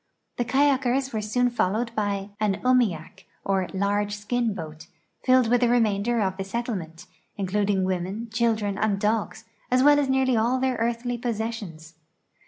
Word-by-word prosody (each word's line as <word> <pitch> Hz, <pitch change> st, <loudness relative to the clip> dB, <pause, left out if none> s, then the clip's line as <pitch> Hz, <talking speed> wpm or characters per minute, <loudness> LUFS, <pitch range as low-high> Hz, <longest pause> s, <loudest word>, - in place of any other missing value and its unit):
The 240 Hz, -, 0 dB
kayakers 270 Hz, 0 st, +1 dB
were 215 Hz, -, -1 dB
soon 245 Hz, +4 st, +1 dB
followed 230 Hz, +1 st, -1 dB
by 205 Hz, -1 st, -2 dB
an 210 Hz, -2 st, +1 dB
umiak, 235 Hz, -11 st, +1 dB, 0.2 s
or 190 Hz, -2 st, 0 dB
large 205 Hz, +1 st, 0 dB
skin 230 Hz, +3 st, -1 dB
boat, 160 Hz, -2 st, -8 dB, 0.4 s
filled 255 Hz, -2 st, +4 dB
with 245 Hz, +1 st, +2 dB
the 240 Hz, -, +3 dB
remainder 230 Hz, -1 st, +2 dB
of 190 Hz, -2 st, -1 dB
the 195 Hz, -, -3 dB
set 235 Hz, +5 st, -3 dB
tlement, 170 Hz, -7 st, -6 dB, 0.3 s
including 200 Hz, 0 st, 0 dB
women, 190 Hz, +5 st, -2 dB
children, 220 Hz, -3 st, 0 dB
and 205 Hz, -2 st, +1 dB
dogs, 215 Hz, +1 st, -1 dB, 0.2 s
as 255 Hz, +1 st, +3 dB
well 290 Hz, 0 st, +6 dB
as 280 Hz, -2 st, 0 dB
nearly 265 Hz, -1 st, +2 dB
all 235 Hz, +3 st, +2 dB
their 260 Hz, -1 st, 0 dB
earthly 235 Hz, +1 st, -2 dB
i)ossessions. 220 Hz, -9 st, -4 dB
220 Hz, 160 wpm, -25 LUFS, 195-245 Hz, 0.4 s, well